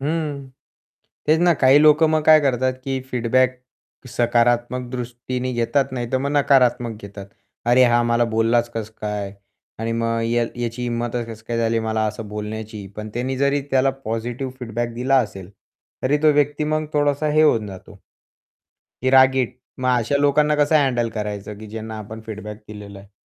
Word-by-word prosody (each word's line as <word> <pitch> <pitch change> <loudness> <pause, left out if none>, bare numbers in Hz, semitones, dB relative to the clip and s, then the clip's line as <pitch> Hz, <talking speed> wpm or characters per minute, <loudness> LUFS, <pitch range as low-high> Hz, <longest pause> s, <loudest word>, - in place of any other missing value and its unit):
हं, 145 -2 -3 0.8
तेच 155 +1 +4
ना 175 -1 +5
काही 135 +2 +6
लोकं 155 +1 +6
मग 155 -1 +2
काय 155 -1 +7
करतात, 130 -2 +1
की 135 -1 -2
फीडबॅक 125 +1 +1 0.5
सकारात्मक 120 +1 +1
दृष्टीने 125 +1 -4
घेतात, 120 +4 +1
नाही 120 -2 -4
तर 130 - +2
मग 140 +2 -2
नकारात्मक 125 -5 +3
घेतात. 100 -1 -9 0.4
"अरे, 125 +2 +5
हा 120 0 +3
मला 120 0 +2
बोललाच 115 +1 +2
कसं 110 -1 -5
काय?" 105 -2 -3 0.5
आणि 115 +1 -2
मग 115 0 -1
या 120 0 +1 0.2
याची 120 +1 -4
हिंमतच 120 0 -2
कसं 110 -1 -10
काय 115 -1 -1
झाली 115 0 +1
मला 110 0 -1
असं 105 0 -5
बोलण्याची? 105 0 -6
पण 105 0 -6
त्यानी 130 +2 -2
जरी 140 +1 +2
त्याला 135 0 +3
पॉझिटिव्ह 120 +4 -4
फीडबॅक 120 0 -3
दिला 130 +3 +1
असेल 95 -3 -11 0.5
तरी 140 +3 +2
तो 155 - +6
व्यक्ती 145 +1 +1
मग 155 0 -1
थोडासा 145 0 +1
हे 155 +1 +4
होऊन 115 -8 +3
जातो, 95 -2 -11 1.1
ही 130 - +2
रागीट. 130 -2 +4 0.2
मग 130 0 -1
अशा 120 +5 0
लोकांना 150 +1 +3
कसं 150 +1 +3
हँडल 120 -3 0
करायचं, 105 -1 -5
की 110 - -10
ज्यांना 110 0 -7
आपण 110 +1 -8
फीडबॅक 105 -1 -7
दिलेला 100 -2 -10
आहे? 100 +1 -16
120 Hz, 170 wpm, -21 LUFS, 110-135 Hz, 1.1 s, काय